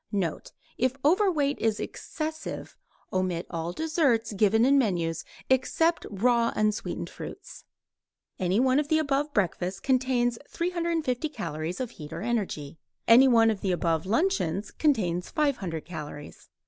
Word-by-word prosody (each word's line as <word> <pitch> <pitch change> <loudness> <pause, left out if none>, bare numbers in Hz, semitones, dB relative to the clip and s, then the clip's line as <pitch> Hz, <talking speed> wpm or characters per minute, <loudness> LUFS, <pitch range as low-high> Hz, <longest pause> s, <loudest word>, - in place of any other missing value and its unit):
Note: 185 -6 -2 0.3
If 255 +1 +1
overweight 320 -5 +3
is 220 -1 +1
excessive 315 0 -5 0.4
omit 185 -2 0
all 165 0 -3
desserts 270 - +1
given 215 +3 +3
in 275 +1 +5
menus 170 - 0 0.2
except 325 +6 +2
raw 235 +3 +2
unsweetened 215 0 -1
fruits. - - -10 0.7
Any 185 +3 +1
one 260 +2 +4
of 300 - -1
the 315 - +3
above 295 -1 0
breakfasts 190 - -1
contains 250 -1 +1
350 335 -6 -1
calories 165 - -4
of 250 -3 -3
heat 150 -6 -10
or 165 +3 -5
energy. 195 -11 -3 0.3
Any 245 +4 +8
one 225 -3 +5
of 205 - -4
the 190 - 0
above 165 -1 0
luncheons 210 - 0
contains 185 - 0
500 210 - -1
calories. 150 -4 -9
230 Hz, 135 wpm, -27 LUFS, 180-280 Hz, 0.7 s, Any